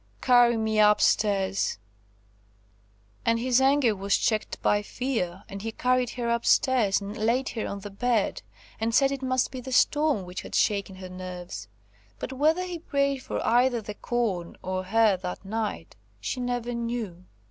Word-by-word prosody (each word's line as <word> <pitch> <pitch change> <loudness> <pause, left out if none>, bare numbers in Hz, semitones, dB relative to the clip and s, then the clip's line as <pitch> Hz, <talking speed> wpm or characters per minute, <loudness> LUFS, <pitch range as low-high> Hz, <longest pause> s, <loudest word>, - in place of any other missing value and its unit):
Carry 240 - +5
me 220 -1 0
up 210 0 +6
stairs!" 195 - +1 1.5
And 230 0 +2
his 250 +2 +2
anger 265 -4 +3
was 200 +1 +1
checked 215 -2 -1
by 205 - +3
fear, 210 -6 -3
and 195 0 -7
he 225 +2 -4
carried 250 +1 +1
her 240 -1 -2
up 235 0 0
stairs 235 -7 +3
and 200 +1 -6
laid 235 +5 0
her 225 - -4
on 200 - -5
the 205 0 -8
bed, 225 0 0 0.4
and 225 +1 0
said 275 -1 +4
it 275 -1 -4
must 255 -1 0
be 255 - -6
the 260 +1 -8
storm 290 -5 +2
which 180 +1 -6
had - - -7
shaken 200 -2 +1
her 185 0 -9
nerves. 180 - -7 0.5
But 265 - -5
whether 310 +7 +2
he 355 -2 -5
prayed 280 -4 0
for - - -4
either 245 +1 +3
the 210 -1 -7
corn 205 -7 -2
or 185 0 -3
her 215 0 +3
that 180 +2 -6
night, 220 +1 -4 0.2
she 255 - -3
never 245 -1 -2
knew. 230 -7 -4
225 Hz, 170 wpm, -26 LUFS, 200-255 Hz, 1.5 s, up